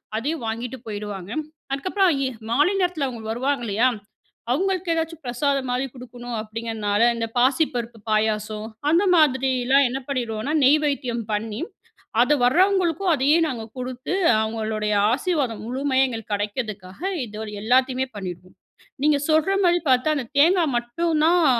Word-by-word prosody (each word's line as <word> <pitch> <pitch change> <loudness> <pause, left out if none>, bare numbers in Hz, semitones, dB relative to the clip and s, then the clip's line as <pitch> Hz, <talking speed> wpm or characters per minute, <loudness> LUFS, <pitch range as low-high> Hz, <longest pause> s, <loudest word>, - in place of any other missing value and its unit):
அதையும் 275 +5 -2
வாங்கிட்டு 235 +3 -4
போயிடுவாங்க. 205 -2 -6 0.4
அதுக்கப்புறம் 370 +7 +2 0.2
எ - - -1 0.2
மாலை 295 +11 +3
நேரத்தில 355 -6 0
அவுங்க 235 -3 -7
வருவாங்கல்லையா? 240 -2 +1 0.6
அவங்களுக்கு 370 +4 0
ஏதாச்சும் 325 -1 -3
பிரசாதம் 265 +2 0
மாரி 250 +2 0
குடுக்கணும் 245 -2 -7
அப்டீங்கிறனால, 220 -1 -2
இந்த 230 -1 -2
பாசிப்பருப்பு 245 -3 +1
பாயாசம். 215 0 0 0.2
அந்த 340 +4 +4
மாதிரிலாம் 265 -3 +3
என்ன 260 +2 -3
பண்ணிடுவோனா, 245 0 -2
நெய்வேத்தியம் 275 -4 +2
பண்ணி, 210 0 -3 0.6
அத 290 +5 +4
வரவங்களுக்கும், 360 +4 +3
அதையே 285 +4 +3
நாங்க 235 -6 -4
குடுத்து, 255 +4 -4 0.3
அவுங்களுடைய 220 -1 -2 0.2
ஆசீர்வாதம் 275 - -1
முழுமையா 265 +1 +1
எங்களுக்கு 225 -4 -5
கிடைக்கிறதுக்காக 205 -1 -5 0.2
இத 215 0 -7 0.2
எல்லாத்தையுமே 255 +2 +2
பண்ணிடுவோம். 185 -1 -8 0.5
நீங்க 300 -1 +4
சொல்ற 315 +4 +3
மாரி 350 0 +4
பார்த்தா, 260 +4 +3
அந்த 255 -4 -4
தேங்கா 340 +3 +5
மட்டும் 305 +7 -1
தான் 345 0 +4
255 Hz, 125 wpm, -23 LUFS, 225-300 Hz, 0.6 s, தேங்கா